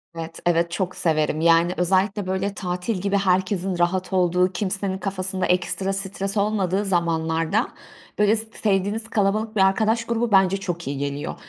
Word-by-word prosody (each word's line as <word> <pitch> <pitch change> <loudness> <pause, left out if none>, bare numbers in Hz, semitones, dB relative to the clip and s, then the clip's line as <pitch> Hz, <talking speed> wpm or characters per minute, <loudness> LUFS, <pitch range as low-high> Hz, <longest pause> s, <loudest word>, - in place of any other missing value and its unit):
Evet, 165 0 -7
evet 170 0 +2
çok 180 +1 -3
severim. 155 -1 0
Yani, 170 +1 +4
özellikle 190 +2 +1
böyle 190 +2 -1
tatil 180 +3 -3
gibi 200 0 0
herkesin 190 -1 0
rahat 185 +2 0
olduğu, 180 0 +2
kimsenin 190 0 -2
kafasında 190 -1 -1
ekstra 185 +2 0
stres 195 +1 -1
olmadığı 200 -1 0
zamanlarda 165 +2 0 0.5
böyle 210 +1 +4
s 220 - -1
sevdiğiniz 205 +2 0
kalabalık 215 +1 0
bir 200 - +2
arkadaş 220 +4 +2
grubu 235 0 -1
bence 195 -1 +4
çok 175 -5 -5
iyi 140 0 -3
geliyor. 140 +1 -4
190 Hz, 150 wpm, -23 LUFS, 175-200 Hz, 0.5 s, Yani